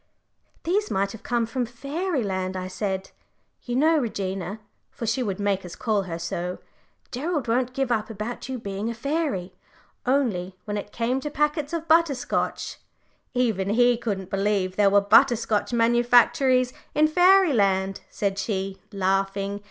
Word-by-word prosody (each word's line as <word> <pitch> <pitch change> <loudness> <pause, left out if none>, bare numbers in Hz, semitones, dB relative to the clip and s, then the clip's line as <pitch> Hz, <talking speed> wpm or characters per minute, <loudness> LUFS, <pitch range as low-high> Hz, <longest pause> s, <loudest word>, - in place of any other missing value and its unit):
"These 405 +6 0
might 195 +1 0
have 225 - -10
come 240 -1 0
from 250 +2 -2
Fairyland," 240 - -2
I 185 0 -4
said. 190 0 -3 0.5
"You 245 - -4
know, 315 +4 +4
Regina" 195 -4 -3 0.3
for 230 - -6
she 230 +4 0
would 200 -5 -2
make 200 -1 0
us 180 - -8
call 205 -4 -1
her 165 - -3
so 175 +1 -4 0.5
"Gerald 295 +1 -2
won't 250 +2 0
give 270 -2 0
up 220 -2 0
about 225 +4 -6
you 260 - -3
being 200 0 -4
a 235 - -4
fairy; 275 - -2 0.5
only 200 -9 0
when 205 -1 -3
it 205 0 -5
came 240 +4 0
to 295 - -4
packets 300 0 0
of 330 -1 -3
butter 325 -2 +4
scotch - - -2 0.3
" - - -40 0.3
"Even 220 -6 +1
he 245 +3 +4
couldn't 200 -5 -4
believe 195 -2 0
there 205 0 +4
were 200 +1 +5
butter 240 +5 +6
scotch 220 -1 -1
manufactories 240 +2 +4 0.2
in 305 +1 +5
Fairyland," 280 - +4
said 200 -1 -2
she, 195 -2 -3
laughing. 195 +1 0
225 Hz, 160 wpm, -25 LUFS, 195-260 Hz, 0.5 s, butter